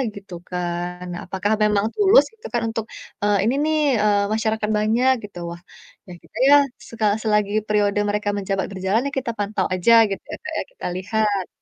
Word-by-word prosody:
Gitu 195 -2 -11 0.2
kan, 175 0 -3
nah 175 - -5
apakah 195 +3 -1
memang 210 0 +2
tulus 415 +3 +6
gitu 450 +2 -19
kan 240 - +1
untuk, 225 -1 -3 0.4
eee, 205 -1 +3
ini 235 +4 +2
nih, 310 0 +1 0.3
eee, 205 -1 +3
masyarakat 220 -1 -1
banyak 235 +5 +3
gitu, 200 -3 -10
wah, 170 0 -9 0.5
ya - - -10
gitu - - -15
ya, 290 - +9 0.3
seka 225 -2 -3 0.2
selagi 210 -1 +1
periode 205 -1 +1
mereka 210 0 -1
menjabat 195 -1 -2
berjalan 190 +4 0
yah 280 - -6
kita 245 -3 -4
pantau 200 -2 -1
aja 185 +6 +3 0.2
gitu 195 - -4
ya, - - -4
Kak, - - -6
ya - - -2
kita - - -10
lihat. 205 0 -1
210 Hz, 185 wpm, -22 LUFS, 195-225 Hz, 0.5 s, ya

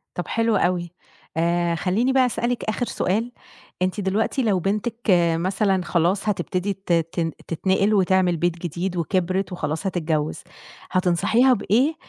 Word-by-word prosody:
طَب 180 - -4
حلو 230 -1 +1
أوي. 175 -2 0 0.5
آآ 170 +1 +1
خلّيني 205 +10 +1
بقى 260 -1 +4
أسألِك 245 0 -1
آخر 215 +3 -1
سؤال، 225 +3 -1 0.5
أنتِ 185 +3 0
دلوقتي 215 +7 0
لو 205 -5 +2
بنتِك 210 +6 -1 0.4
مثلًا 190 +2 0
خلاص 180 +5 +1
هتبتدي 185 0 -1
ت 195 -2 -3
تـن 165 0 0 0.2
تتنقِل 190 +5 +1
وتعمل 190 -3 +3
بيت 175 +1 0
جديد 175 +2 -3
وكِبرت 185 +2 -1
وخلاص 160 0 -3
هتتجوز، 160 -4 -2 0.5
هتنصحيها 185 +8 +3
بإيه 255 +7 +1
185 Hz, 135 wpm, -23 LUFS, 175-215 Hz, 0.5 s, بقى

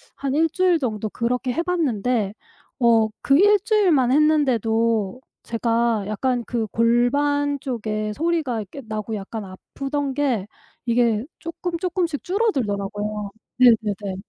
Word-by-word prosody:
한 275 -1 -3
1 320 +1 +3
주일 360 0 +2
정도 215 -5 -2
그렇게 250 +3 -1
해 335 - 0
봤는데 250 - 0 0.5
어 230 -2 +4
그 275 +1 +4
1 415 +1 +6
주일만 360 - +3
했는데도 230 -7 +2 0.2
제가 230 -2 0
약간 245 +3 -1
그 225 0 -2
골반 285 +6 +1
쪽에 215 -4 -3
소리가 310 -4 -1
이렇게 210 +8 -9
나고 215 0 -4
약간 210 +2 -6
아프던 275 +9 -4
게 255 -9 0 0.4
이게 235 -1 +2
쪼끔 335 +1 -4
쪼끔씩 350 -4 -2
줄어들더라고요. 210 - -1 0.3
네네네. 210 -5 +3
245 Hz, 255 characters per minute, -22 LUFS, 215-290 Hz, 0.5 s, 1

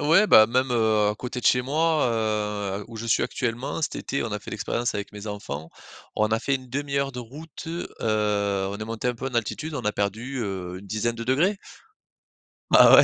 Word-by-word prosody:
Ouais 165 +8 +5
bah 110 - +8
même, 130 +2 +1
heu, 110 -3 +3
à - - -3
côté 125 +2 -5
de - - -12
chez 125 - +5
moi, 155 +1 +2
heu, 105 -3 -1
où 115 - -9
je 115 +1 -5
suis 115 - +3
actuellement 120 +4 -2
cet - - -1
été 140 - -2
on 110 - -4
a 105 - -1
fait - - -10
l'expérience 120 +3 -1
avec 100 -1 -4
mes 105 +1 -8
enfants. 80 -7 -5 0.5
On 110 0 +3
a 110 0 +2
fait 140 - +1
1/2 140 +1 -2
de 125 - -7
route. 145 +8 -10
Heu, 170 +1 -3
on 100 -2 0
est 110 - -4
monté 115 +2 -2
un 125 - 0
peu 125 +3 -5
en 125 - -5
altitude, 150 +7 -2
on - - -3
a 105 - +1
perdu, 110 +7 -2
heu, 95 -3 -4
une 100 - -13
dizaine 110 +3 -1
de 115 0 -5
degrés. 170 - +2 1.2
Ah - - +10
ouais - - +9
115 Hz, 215 wpm, -25 LUFS, 105-130 Hz, 1.2 s, Ah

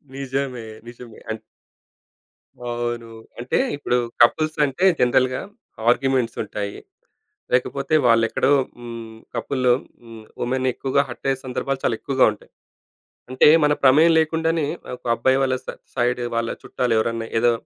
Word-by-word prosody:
నిజమే. 135 -3 -3 0.2
నిజమే. 120 -1 -12
అన్ 110 0 -3 1.3
అవును. 120 -1 -3 0.3
అంటే 120 +1 -1 0.2
ఇప్పుడు 130 -3 0 0.3
కపుల్స్ 155 +6 +3
అంటే 145 +6 -1 0.2
జనరల్‌గా 125 +1 +2 0.5
ఆర్గ్యుమెంట్స్ 130 -2 +1
ఉంటాయి. 100 -1 -5 0.8
లేకపోతే 140 +3 0
వాళ్ళు 115 -1 +5
ఎక్కడో 135 - +1 0.3
హ్మ్. 115 -2 -8 0.2
కపుల్ 130 +2 -2 0.4
హ్మ్. 115 -2 -12 0.2
వుమెన్ 130 +1 0
ఎక్కువగా 135 +1 +1
హర్ట్ 120 - -7
అయ్యే 135 0 -1
సందర్భాలు 135 +1 -3
చాలా 115 - +1
ఎక్కువగా 135 -1 +2
ఉంటాయి. 105 - -14 0.8
అంటే 130 - +4 0.2
మన 150 - +4
ప్రమేయం 150 +5 +6
లేకుండానే 160 -1 +1 0.3
ఒక 125 - -17
అబ్బాయి 130 +3 +2
వల్ల 130 -1 +1
స - - -24 0.3
సైడ్ 125 -1 0 0.2
వాళ్ళ 115 0 -1
చుట్టాలు 125 -2 -2
ఎవరన్నా 115 0 -1
ఏదో 120 +1 +4
125 Hz, 130 wpm, -22 LUFS, 115-135 Hz, 1.3 s, ప్రమేయం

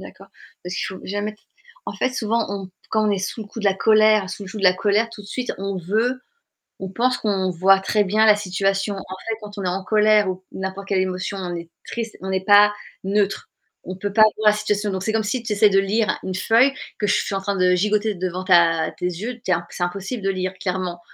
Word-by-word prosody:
d'accord. - - -13 0.3
Parce 180 +1 -5
qu'il - - -2
faut - - -12
jamais 205 +2 -3
t - - -30 0.5
en - - -3
fait 255 - 0
souvent, 230 -2 -1
on 195 -2 -5 0.2
quand 215 -1 +2
on - - +2
est 200 - +1
sous 195 +4 -4
le - - -11
coup 225 - -8
de - - -7
la 195 -1 +3
colère, 215 -2 +4
sous 205 - -7
le 190 - -9
joug 210 - -7
de 200 - -6
la 180 - +7
colère, 210 +4 +1
tout 220 - -11
de - - -14
suite 250 +4 -3
on 195 0 -3
veut 220 +8 -1 0.6
on 190 - -5
pense 250 +6 +1
qu'on 195 -3 0
voit 190 +3 +4
très 205 +2 +1
bien 215 +3 +2
la 215 -1 +7
situation. 195 0 -1
En - - -6 0.3
fait 225 - -1
quand 205 0 -10
on 200 - -4
est - - -1
en 185 +2 -2
colère 210 0 +3
ou 185 - -1
q 185 - -29
n'importe 190 +1 -5
quelle 195 -2 +1
émotion, 185 +2 -3
on 180 -2 -4
est 170 0 -7 0.2
triste, 230 -2 -5
on 190 0 -4
est 190 0 -1
pas 205 0 +7 0.3
neutre. 200 +1 0 0.4
On 185 0 -6
peut 200 +1 -4
pas 215 0 +6
voir 215 -1 +4
la - - -1
situation. 210 -1 -1
Donc 190 -1 -3
c'est 220 - 0
comme 220 -1 +1
si 230 +3 -2
tu 220 - -2
essaies 210 +1 +5
de 195 -1 +4
lire 210 +2 +1
une 185 - -4
feuille 230 +8 +3 0.3
que 205 - 0
je 205 - +3
suis 205 - -1
en 195 - -2
train 200 0 -2
de 180 0 +4
gigoter 210 +3 +1
devant 185 0 -3
ta 170 -3 +4
tes 180 - -4
yeux, 215 +8 -4
tu 190 - 0
es - - +6
in 170 0 -2
c'est - - -4
impossible 195 +5 -4
de 195 - +1
lire 185 -1 -2
clairement. 180 -2 -3
200 Hz, 260 wpm, -22 LUFS, 185-215 Hz, 0.6 s, la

